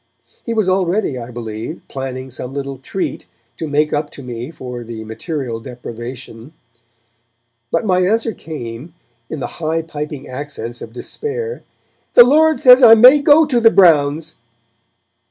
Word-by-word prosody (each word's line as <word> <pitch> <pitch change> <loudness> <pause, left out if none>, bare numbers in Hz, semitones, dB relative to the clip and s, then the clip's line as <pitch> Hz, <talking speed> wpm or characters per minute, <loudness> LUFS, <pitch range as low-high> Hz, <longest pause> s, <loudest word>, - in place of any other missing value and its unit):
He 230 - -3
was 215 -4 +1
already, 185 -6 0
I 120 0 -8
believe, 115 +4 -7
planning 130 -1 -6
some 125 +2 -7
little 140 -2 -5
treat 185 +8 -5 0.3
to 160 - -4
make 150 +1 0
up 150 0 -1
to 140 - -10
me 120 +1 -6
for 125 -6 -8
the 115 -1 -8
material 120 +1 -5
deprivation. 120 +1 -9 1.2
But 225 - -1
my 185 -3 +2
answer 225 +2 +1
came, 150 -1 -8 0.3
in 155 - -6
the - - -2 0.2
high 160 +1 -1
piping 150 -3 -7
accents 130 -3 -7
of 115 - -9
despair: 455 - -5 0.5
'The 240 - +11
Lord 310 +3 +3
says 250 0 +7
I 225 -2 +9
may 255 +6 +7
go 295 +2 +6
to 260 -5 +1
the 225 -1 +6
Browns.' 160 -5 +3
150 Hz, 150 wpm, -17 LUFS, -, 1.2 s, The